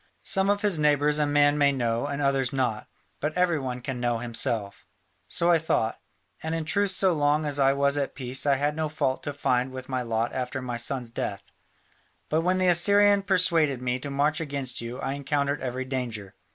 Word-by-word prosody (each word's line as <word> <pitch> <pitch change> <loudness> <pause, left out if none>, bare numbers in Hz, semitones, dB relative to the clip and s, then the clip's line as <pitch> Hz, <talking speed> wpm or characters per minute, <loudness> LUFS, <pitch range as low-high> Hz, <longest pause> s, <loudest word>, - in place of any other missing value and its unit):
Some 195 0 +1
of 205 0 +1
his 200 -6 +2
neighbours 150 0 +2
a 150 - +2
man 145 0 +3
may 140 -1 +4
know 120 -1 -1
and 145 0 -3
others 135 -2 +1
not: 125 -5 -2 0.3
but 155 +3 -3
every 175 -3 +2
one 125 -2 -5
can 130 -1 -5
know 120 -1 0
himself. 115 -3 -1 0.4
So 170 +1 +2
I 170 - +4
thought, 115 -8 -1 0.4
and 160 +1 -3
in 165 -1 -3
truth 200 +5 +1
so 190 -1 +2
long 150 0 +1
as 145 -1 -1
I 135 0 +4
was 140 +1 +1
at 140 - -3
peace 130 +1 -2
I 140 - +4
had 145 +2 -1
no 155 -1 -2
fault 135 -3 -1
to 145 - -4
find 130 -2 0
with 130 0 -8
my 130 -1 -1
lot 115 -1 -2
after 130 +1 -3
my 125 -2 -4
son's 120 0 -2
death; 100 -3 -4 0.9
but 160 +1 +1
when 180 +2 +1
the 185 0 +1
Assyrian 200 +3 +5
persuaded 170 -8 +2
me 125 0 -2
to 140 - -6
march 145 +4 0
against 140 -5 -2
you 120 +2 -6
I 135 - -2
encountered 140 0 -1
every 130 0 -3
danger. 120 -7 -5
140 Hz, 205 wpm, -26 LUFS, 125-155 Hz, 0.9 s, Assyrian